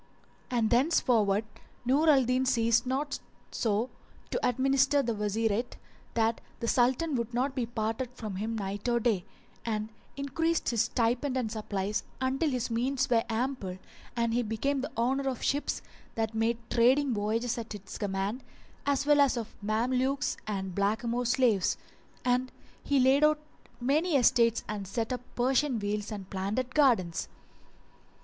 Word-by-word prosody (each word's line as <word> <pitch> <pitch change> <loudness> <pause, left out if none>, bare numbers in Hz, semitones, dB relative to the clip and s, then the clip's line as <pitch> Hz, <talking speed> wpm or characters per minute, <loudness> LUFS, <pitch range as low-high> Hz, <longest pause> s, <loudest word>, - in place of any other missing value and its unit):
And 235 -3 +1
thenceforward 235 -6 +3 0.4
Nur 285 +6 +4
al 270 -4 +5
Din 255 +2 +2
ceased 230 -1 +3
not 275 +3 -1 0.3
so 220 +2 0 0.4
to - - -2
administer 270 +3 +3
the 235 -2 0
Wazirate 215 +2 -1 0.4
that 225 0 +1 0.2
the 230 - -3
Sultan 260 +7 +2
would 235 -2 -2
not 260 +3 +1
be 250 -4 -2
parted 225 +2 -2
from 215 -6 -5
him 225 +3 -2
night 200 +3 -3
or 235 0 +2
day; 215 -6 +1 0.4
and 215 -1 -2 0.3
increased 325 +4 0
his 230 -2 +2
stipend 245 +3 0
and 230 -4 -1
supplies 210 -2 -2 0.2
until 265 +4 +1
his 250 -3 -2
means 255 +3 0
were 230 -1 +4
ample 225 -5 -2 0.4
and 235 -1 +1
he 245 - +2
became 245 +5 -1
the 280 - -4
owner 265 +4 +1
of 255 - -5
ships 285 +2 0 0.3
that 225 -1 -1
made 225 +1 +1
trading 255 +3 +4
voyages 225 +3 -1
at 230 - -7
his 200 -2 -8
command, 200 +4 -2 0.4
as 280 0 +2
well 295 -1 +5
as 275 -3 +3
of 230 -2 -5
Mamelukes 250 +6 0
and 190 -3 -3
blackamoor 230 +5 0
slaves; 240 -6 +2 0.5
and 250 +1 +1 0.3
he 280 -1 +2
laid 265 +3 +5
out 305 0 +5 0.4
many 295 +7 +1
estates 235 -3 +4
and 205 -2 -4
set 225 +5 -2
up 250 - -4
Persian 260 +1 +2
wheels 205 0 -2
and 200 -3 -6
planted 205 +7 -2
gardens. 230 - +3
235 Hz, 150 wpm, -29 LUFS, 220-260 Hz, 0.5 s, al